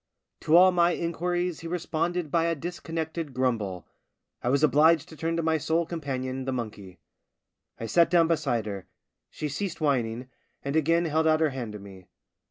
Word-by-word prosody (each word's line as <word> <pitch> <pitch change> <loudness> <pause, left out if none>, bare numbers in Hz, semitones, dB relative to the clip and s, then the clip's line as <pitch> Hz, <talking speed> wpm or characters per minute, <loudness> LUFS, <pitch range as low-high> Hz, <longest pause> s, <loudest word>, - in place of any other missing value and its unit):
To 155 - +2
all 185 +1 +7
my 175 -1 +3
inquiries 175 0 -2
he 165 - -7
responded 170 -1 -2
by 165 -1 +2
a 170 0 +1
dis 175 +4 -6
connected 160 -3 -4
grumble. 110 -9 -1 0.6
I 120 - -1
was 140 +3 +2
obliged 155 +2 +4
to 160 - -11
turn 165 +2 -2
to 165 - 0
my 160 0 +1
sole 165 +3 0
companion, 130 -5 -4
the 135 - -1
monkey. 105 -7 -6 0.8
I 115 - -4
sat 170 +8 +4
down 170 -1 +4
beside 140 -9 0
her; 100 -3 -6 0.4
she 150 - -4
ceased 175 +5 -4
whining, 125 -5 0 0.4
and 140 +2 -2
again 165 +2 +3
held 160 0 +1
out 155 0 +4
her 160 -1 +3
hand 120 -5 -5
to - - -6
me. 95 -2 -13
155 Hz, 180 wpm, -27 LUFS, 130-170 Hz, 0.8 s, all